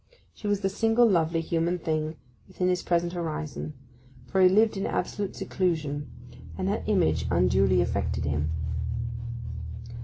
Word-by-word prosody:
She 210 - -7
was 205 -1 +1
the 195 - +1
single 225 +4 +4
lovely 165 -4 +2
human 165 +2 0
thing 155 -1 -1 0.3
within 180 0 -1
his 180 -1 +1
present 170 0 +1
horizon, 155 -3 -4 0.5
for 190 - +1
he 185 - +8
lived 215 +3 +4
in 195 - -1
absolute 200 -2 -2
seclusion; 155 -6 -1 0.5
and - - -1
her - - 0
image 80 0 +2
unduly 90 +1 +4
affected 85 - -1
him. 75 +1 0
170 Hz, 135 wpm, -27 LUFS, 145-190 Hz, 0.5 s, he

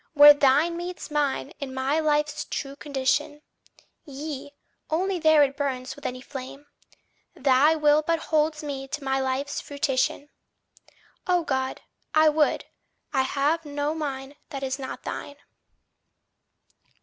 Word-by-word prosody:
Where 290 0 +11
thine 290 +4 +3
meets 350 -2 -6
mine 290 -1 0
is 280 -2 -4
my 265 +4 0
life's 300 -1 0
true 275 0 -5
condition; 290 +1 -1 0.6
Yea, 285 -1 -7 0.4
only 365 +3 0
there 315 -2 +6
it 275 -1 0
burns 265 -2 -3
with 285 - -5
any 255 0 -6
flame. 270 +1 -8 0.7
Thy 280 +4 +4
will 300 -1 +4
but 330 +2 +1
holds 310 -1 0
me 275 -2 -5
to 290 +1 -5
my 270 0 0
life's 265 +2 -2
fruition. 285 0 -1 1.0
O 360 -2 +2
God, 265 -3 -2 0.3
I 310 0 +6
would 300 0 +1 0.5
I 265 - +3
have 290 +5 0
no 290 0 -2
mine 280 -2 -5
that 275 -1 -6
is 265 +1 -2
not 265 - -6
thine. 285 - -6
290 Hz, 135 wpm, -25 LUFS, 270-305 Hz, 1.0 s, Where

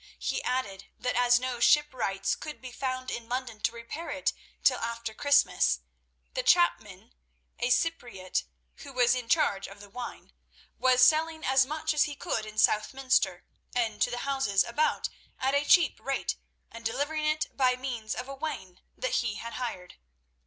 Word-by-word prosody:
He - - -2
added 215 -7 -2
that 250 - -2
as 245 0 +5
no 255 -1 -3
shipwrights 240 -8 +2
could 300 - -8
be 255 -1 -9
found 255 0 -3
in 235 -1 -6
London 245 -3 -3
to - - +2
repair 235 +8 -7
it 285 - -1 0.3
till 255 - +4
after 230 -1 -4
Christmas, 285 +4 +3 0.5
the - - 0
chapman, 245 - +2 0.5
a 245 - 0
Cypriote, 240 - 0 0.3
who 285 - -10
was 245 -1 +4
in 250 -2 -4
charge 195 -3 +2
of 200 +1 -12
the 205 -1 -13
wine, 245 +2 -8 0.5
was 255 -1 +5
selling 315 +3 +4
as 265 0 +4
much 315 +1 -1
as 300 - +4
he 295 - -5
could 220 -4 -3
in 215 0 -10
Southminster 255 +6 +2 0.3
and 235 -3 0
to - - +4
the 245 +1 -4
houses 270 -8 +2
about 300 +6 0 0.3
at 265 +1 +1
a 285 +1 +3
cheap 330 +1 +4
rate, 275 0 -2 0.4
and 230 0 -10
delivering 290 +7 -1
it 305 0 -1
by 255 -2 +3
means 245 -4 -4
of 250 - -5
a 275 - -6
wain 265 - -6 0.2
that 255 - 0
he 225 -4 -2
had 230 +3 -7
hired. 190 -8 -5
250 Hz, 170 wpm, -29 LUFS, 230-280 Hz, 0.5 s, as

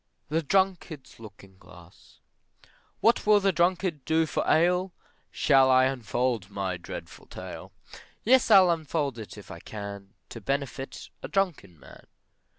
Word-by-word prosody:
THE 160 +2 0
DRUNKARD'S 175 -6 -1
LOOKING 100 -3 -14
GLASS! 90 0 -18 0.8
What 230 -2 +3
will 210 -1 +6
the 195 -1 +2
drunkard 175 -4 0
do 160 0 +2
for - - -2
ale? 180 +3 +2 0.4
Shall 135 -1 +4
I 130 0 +5
unfold 125 -4 -1
my 95 -2 -3
dreadful 85 - -9
tale? - - -9 0.5
Yes, 255 +2 +4
I'll 190 -4 +7
unfold 150 -6 -2
it 105 -1 -9
if 100 -3 -12
I 85 - -8
can, 100 0 -9
To 115 - -9
benefit 135 +2 -4
a - - -6
drunken 160 - -2
man. 65 - -16
135 Hz, 140 wpm, -27 LUFS, -, 0.8 s, I'll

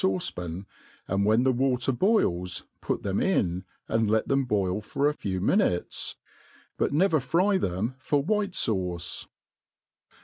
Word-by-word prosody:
&uce 185 -1 +1
pan, 90 +2 -6 0.4
aod 100 +1 +1
when 110 +4 +4
the 130 - +4
water 125 0 +1
boils 95 - +1 0.2
put - - -2
them - - 0
in^ 90 +1 +1 0.2
and 115 -1 +1
let 110 0 +2
them 135 -1 +2
boil 100 -4 0
for 140 +6 0
a 150 - +2
itw 95 -9 -3
minutes, 95 - 0 0.6
but - - 0
never 160 +2 +3
fr]^ 180 +9 +2
them 95 +7 -1
for 140 +2 +1
white 210 +4 0
fauce. 90 -5 -1
115 Hz, 145 wpm, -27 LUFS, 95-150 Hz, 0.6 s, when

